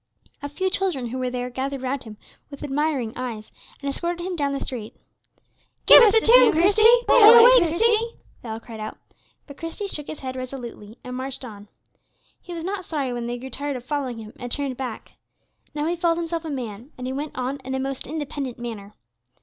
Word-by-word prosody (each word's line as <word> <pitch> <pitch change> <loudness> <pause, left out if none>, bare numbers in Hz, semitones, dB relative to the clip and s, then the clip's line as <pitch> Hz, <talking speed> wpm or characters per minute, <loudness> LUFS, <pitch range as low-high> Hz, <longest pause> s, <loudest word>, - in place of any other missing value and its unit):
A 285 - -5
few 375 +6 -2
children 345 -12 -1
who 260 +2 -4
were 255 -1 -1
there 250 0 -4
gathered 265 +1 -4
round 260 0 -3
him 215 -1 -10 0.3
with 280 - -10
admiring 280 -5 -1
eyes, 230 -4 -6 0.3
and 280 - -6
escorted 345 +5 -3
him 370 -1 -3
down 285 -3 -1
the 275 - -2
street. 225 -4 -6 0.9
"Give - - +10
us 445 -2 +6
a 445 - +6
tune, 485 +3 +7
Christie; 385 +7 +3 0.3
play - - +6
away, 470 +3 +9
Christie," 445 +7 +2 0.3
they 235 - -9
all 220 0 -4
cried 225 -1 -10
out. 215 0 -6 0.5
But 280 -1 -12
Christie 330 +5 -5
shook 295 -6 -6
his 310 - -7
head 260 -1 -5
resolutely, 245 -4 -8
and 250 0 -6
marched 260 0 -5
on. 205 -3 -11 0.7
He 360 - -11
was 335 -1 -5
not 380 +1 -3
sorry 285 -7 -3
when 240 -1 -4
they 240 0 -3
grew 260 +2 -9
tired 285 0 -3
of 250 -1 -7
following 270 -4 -3
him 220 -1 -10
and 245 -1 -7
turned 280 -2 -1
back. 250 -3 -6 0.6
Now 295 0 -1
he 340 +2 0
felt 335 -1 +1
himself 335 -1 -3
a - - -4
man; 245 -2 -6
and 250 - -6
he 260 - -3
went 290 +1 -5
on 260 +2 -2
in 265 +1 -4
a - - -1
most 270 0 -4
independent 285 -4 -5
manner. 220 -4 -7
275 Hz, 210 wpm, -23 LUFS, 245-330 Hz, 0.9 s, Give